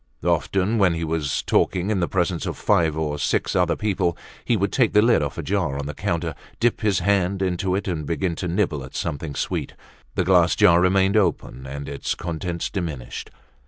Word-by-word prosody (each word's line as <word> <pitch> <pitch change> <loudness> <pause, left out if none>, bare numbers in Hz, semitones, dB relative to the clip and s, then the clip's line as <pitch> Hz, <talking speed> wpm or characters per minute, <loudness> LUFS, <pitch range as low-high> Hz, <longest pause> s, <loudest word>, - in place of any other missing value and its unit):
Often, 100 +4 +1
when 90 -4 +4
he 85 - -3
was 80 -3 -1
talking 95 +2 +1
in 100 - +1
the 85 - +1
presence 90 -2 -1
of - - -4
five 80 -2 +2
or 75 -2 -2
six - - 0
other - - +2
people, 95 -5 0 0.3
he 120 - +1
would 100 0 0
take 125 -4 +2
the 105 - +6
lid 115 -8 +4
off 75 -1 -3
a 85 - -3
jar 85 -5 -1
on 70 - -4
the 75 - -4
counter, 85 +1 -2 0.3
dip 120 0 +1
his 105 -4 +1
hand 100 -1 +1
into 90 0 0
it 100 - -2
and 85 -5 -2
begin 85 +1 -1
to 90 - -3
nibble 85 -6 0
at 65 - -11
something 75 0 -3
sweet; - - -3 0.4
the - - +2
glass 90 -1 +4
jar 85 0 +5
remained 95 +2 +3
open 75 - -1
and 70 +1 -6
its 70 - -3
contents 85 0 -3
diminished. 80 -11 -5
90 Hz, 200 wpm, -23 LUFS, 80-95 Hz, 0.4 s, the